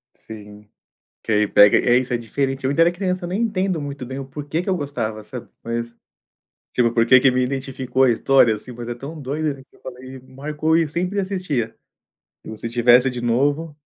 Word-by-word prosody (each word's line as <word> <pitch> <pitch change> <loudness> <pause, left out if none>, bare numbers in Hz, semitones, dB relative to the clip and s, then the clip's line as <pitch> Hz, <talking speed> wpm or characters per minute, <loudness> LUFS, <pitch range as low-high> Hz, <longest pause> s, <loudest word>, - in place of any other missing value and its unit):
Sim. 105 -1 -12 0.5
Que - - -4
aí 105 0 +3
pega 100 0 +6
é, 120 0 +3
isso 125 0 -1
é - - +2
diferente. 135 +4 -3
Eu - - +2
ainda 145 +4 +4
era 170 - +3
criança, 180 0 -3
nem 185 +5 -2
entendo 190 -7 -1
muito 140 -2 -6
bem 130 +2 -6
o 135 - -6
porquê 145 +4 -4
que 180 - -5
eu 190 - +2
gostava, 115 -8 -4
sabe. 125 +2 -9
Mas, 115 0 -4 0.8
tipo, 120 -2 +2
porque 120 +2 +5
que 135 - +5
me 130 0 +1
identificou 130 0 -1
a 130 - +4
história, 120 0 +4
assim, 110 +4 -9
mas 120 0 -8
é 120 - -3
tão 145 +6 -9
doida, 145 +2 -2
né, 135 - -14
que - - -24
eu - - -26
falei, 130 +1 -10
marcou 150 +5 -2
e 165 - +4
eu 155 - -3
sempre 180 +6 -2
assistia. 180 - -3 0.7
E - - -10
o 110 - -8
se 115 - -5
tivesse 120 +2 +4
de 125 -1 -6
novo 145 +6 0
130 Hz, 215 wpm, -21 LUFS, 120-150 Hz, 0.8 s, pega